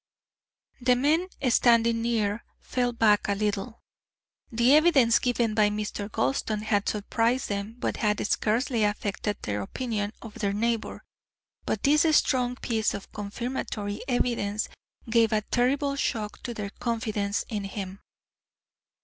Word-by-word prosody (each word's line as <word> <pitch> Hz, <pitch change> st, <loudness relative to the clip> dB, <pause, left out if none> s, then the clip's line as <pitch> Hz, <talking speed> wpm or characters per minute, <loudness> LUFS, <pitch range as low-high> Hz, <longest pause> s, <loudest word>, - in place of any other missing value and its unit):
The 250 Hz, 0 st, +4 dB
men 305 Hz, +8 st, +2 dB, 0.2 s
standing 230 Hz, -1 st, +4 dB
near 225 Hz, -2 st, 0 dB, 0.2 s
fell 245 Hz, -1 st, -1 dB
back 220 Hz, -3 st, +3 dB
a 200 Hz, -, +1 dB
little. 210 Hz, +2 st, -3 dB, 0.7 s
The 235 Hz, +3 st, +4 dB
evidence 290 Hz, -8 st, +5 dB
given 240 Hz, -3 st, 0 dB
by 210 Hz, -1 st, +4 dB
Mr. 210 Hz, 0 st, -4 dB
Gulston 205 Hz, -, -1 dB
had 205 Hz, -2 st, +1 dB
surprised 230 Hz, +4 st, 0 dB
them, 200 Hz, +2 st, -3 dB
but -, -, -2 dB
had 210 Hz, -2 st, 0 dB
scarcely 225 Hz, +3 st, +1 dB
affected 205 Hz, 0 st, -1 dB
their 105 Hz, 0 st, -2 dB
opinion 210 Hz, -, -3 dB
of 225 Hz, -2 st, -9 dB
their 200 Hz, -2 st, 0 dB
neighbour, 230 Hz, +2 st, -2 dB, 0.6 s
but -, -, -1 dB
this 295 Hz, +2 st, +5 dB, 0.2 s
strong 250 Hz, -2 st, +1 dB
piece 225 Hz, -3 st, -1 dB
of 200 Hz, -, -9 dB
confirmatory 210 Hz, -1 st, -4 dB
evidence 230 Hz, -5 st, 0 dB, 0.4 s
gave 225 Hz, -1 st, +3 dB
a 215 Hz, -1 st, +2 dB
terrible 270 Hz, +5 st, +1 dB
shock 215 Hz, -6 st, -2 dB
to 240 Hz, -2 st, -5 dB
their 200 Hz, -2 st, -5 dB
confidence 215 Hz, -3 st, -2 dB
in 210 Hz, -3 st, -3 dB
him. 195 Hz, -1 st, -6 dB
225 Hz, 130 wpm, -27 LUFS, 205-245 Hz, 0.7 s, evidence